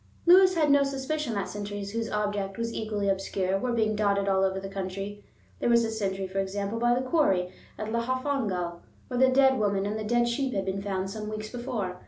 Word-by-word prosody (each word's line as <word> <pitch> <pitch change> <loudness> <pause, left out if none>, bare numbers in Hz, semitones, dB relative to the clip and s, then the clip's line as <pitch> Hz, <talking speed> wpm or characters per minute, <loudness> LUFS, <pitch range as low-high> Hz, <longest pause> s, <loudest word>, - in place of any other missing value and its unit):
Lewis 370 +1 +7
had 305 -3 +3
no 285 0 +6
suspicion 275 -1 -2
that 200 - -1
sentries 205 -1 -5
whose 225 +1 -2
object 205 -2 -2
was 230 0 -2
equally 210 -2 -2
obscure 195 0 0
were 250 +4 -1
being 220 -2 +1
dotted 200 -1 +1
all 190 -1 +3
over 190 0 +1
the 195 - -6
country. 195 +1 -5 0.4
There - - +1
was 235 -1 +5
a 225 - -2
sentry, 195 -3 -2
for 190 +1 -3
example, 200 +3 -2
by 240 +1 +3
the 255 +1 -2
quarry 190 - +2 0.2
at 215 0 -4
Llanfihangel, 235 -8 -1 0.3
where 250 -1 -2
the 260 - +6
dead 265 -1 +4
woman 200 -2 +1
and 210 +2 -2
the - - -3
dead 240 +2 +2
sheep 255 +1 -1
had 195 -1 -1
been 190 +1 -2
found 195 -1 -2
some 210 0 -5
weeks 215 0 -5
before. 220 -7 -4
210 Hz, 215 wpm, -28 LUFS, 195-240 Hz, 0.4 s, Lewis